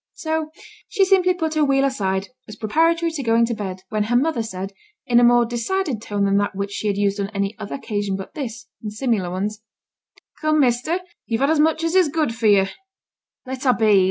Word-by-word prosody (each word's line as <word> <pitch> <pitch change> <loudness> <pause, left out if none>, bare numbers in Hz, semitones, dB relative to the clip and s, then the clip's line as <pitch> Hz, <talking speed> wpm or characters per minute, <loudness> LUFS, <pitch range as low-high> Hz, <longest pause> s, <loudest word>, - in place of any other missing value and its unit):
So 315 -1 -2 0.4
she 395 -2 +3
simply 365 -1 +3
put 320 -3 -2
her 310 -1 +2
wheel 275 -1 +3
aside, 195 -7 -1 0.2
as 215 - -9
preparatory 330 +9 +1
to 315 -3 -4
going 230 -1 +3
to 235 - -2
bed, 190 -4 -5
when 215 -1 0
her 240 +3 0
mother 280 0 +2
said, 195 -2 -5 0.3
in 240 -1 +4
a - - +4
more 240 0 +5
decided 245 - -2
tone 205 -2 -1
than 200 0 +2
that 205 -1 0
which 200 +1 -3
she 210 - -3
had 200 -1 0
used 200 0 +1
on 200 0 -2
any 200 +1 -1
other - - -5
occasion 205 -7 -2
but 190 0 -7
this, 245 -4 -6 0.2
and 210 - -5
similar 215 -5 -1
ones 205 +4 -3 0.8
'Come, 310 -1 +2
measter, 265 +7 +1 0.3
you've 225 +1 -1
had 280 +3 +3
as 320 - +2
much 320 +1 +2
as 330 0 0
is 370 -4 +4
good 305 -5 0
for 225 -1 0
you.' 200 -2 +5 0.8
'Let 260 0 -6
a' 255 -3 +4
be! 215 -3 +4
235 Hz, 215 wpm, -22 LUFS, 205-310 Hz, 0.8 s, more